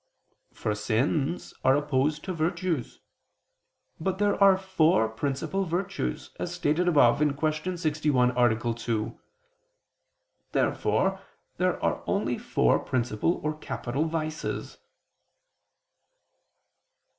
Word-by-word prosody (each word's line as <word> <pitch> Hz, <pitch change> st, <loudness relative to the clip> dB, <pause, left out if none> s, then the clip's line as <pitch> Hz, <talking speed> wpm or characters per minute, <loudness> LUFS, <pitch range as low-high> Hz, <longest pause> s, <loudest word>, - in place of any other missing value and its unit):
For 105 Hz, -, -2 dB
sins 135 Hz, +9 st, -1 dB
are 130 Hz, -, +5 dB
opposed 145 Hz, +1 st, 0 dB
to 190 Hz, -, -3 dB
virtues. 165 Hz, -4 st, -2 dB, 1.0 s
But 190 Hz, +3 st, -1 dB
there 205 Hz, 0 st, +2 dB
are 195 Hz, -1 st, +7 dB
four 165 Hz, -, +2 dB
principal 135 Hz, +11 st, -2 dB
virtues, 175 Hz, -, -3 dB
as -, -, -3 dB
stated 160 Hz, +5 st, +1 dB
above 140 Hz, -7 st, +5 dB
(Q. 155 Hz, +4 st, 0 dB
61, 150 Hz, -6 st, +2 dB
A. 120 Hz, -1 st, +2 dB
2). 115 Hz, -2 st, -3 dB, 1.3 s
Therefore -, -, +1 dB, 0.4 s
there -, -, 0 dB
are -, -, 0 dB
only -, -, 0 dB
four -, -, +2 dB
principal 125 Hz, +4 st, 0 dB
or 155 Hz, 0 st, -1 dB
capital 140 Hz, -1 st, -3 dB
vices. 155 Hz, -1 st, -4 dB
150 Hz, 100 wpm, -27 LUFS, 125-170 Hz, 1.3 s, are